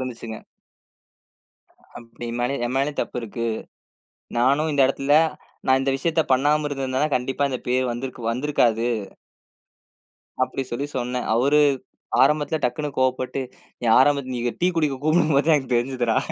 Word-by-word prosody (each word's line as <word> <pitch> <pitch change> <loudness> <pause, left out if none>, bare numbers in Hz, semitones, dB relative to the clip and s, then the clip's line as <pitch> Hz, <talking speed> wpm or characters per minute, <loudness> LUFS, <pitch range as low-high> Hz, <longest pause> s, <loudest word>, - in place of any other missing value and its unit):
இருந்துச்சுங்க. 115 -3 -6 1.6
அப்டி 115 0 -11
என் 120 - -4
மேல 125 +3 0
என் 120 - -2
மேலயும் 140 +2 -1
தப்பு - - -2
இருக்கு. 115 +1 -4 0.9
நானும் 140 +6 +2
இந்த 140 -1 +2
எடத்துல, 140 +2 +2 0.5
நான் 130 0 +5
இந்த 135 0 0
விஷயத்தைப் 160 0 0
பண்ணாம 150 +3 +2
இருந்திருந்தேன்னா, 135 +1 -1
கண்டிப்பா 135 +3 0
இந்தப் 130 - -5
பேரு 130 +1 +2
வந்திருக்கு 120 -1 -4
வந்திருக்காது. 120 -3 +1 1.5
அப்படி 130 +1 -1
சொல்லி 140 +4 -2
சொன்னேன். 125 0 -2
அவரு 140 +5 +4 0.6
ஆரம்பத்துல 150 +1 +2
டக்குன்னு 145 +5 -1
கோபப்பட்டு, 130 +1 0 0.4
"நீ 120 - -3
ஆரம்பத்துல 135 -1 +2
நீ 120 - -3 0.2
டீ 175 - +3
குடிக்க 150 -5 +1
கூப்பிடும்போதே 155 -3 +3
தான் 160 - +5
எனக்குத் 130 -3 -2
தெரிஞ்சுதுரா" 120 -2 0
130 Hz, 135 wpm, -23 LUFS, 125-145 Hz, 1.6 s, நான்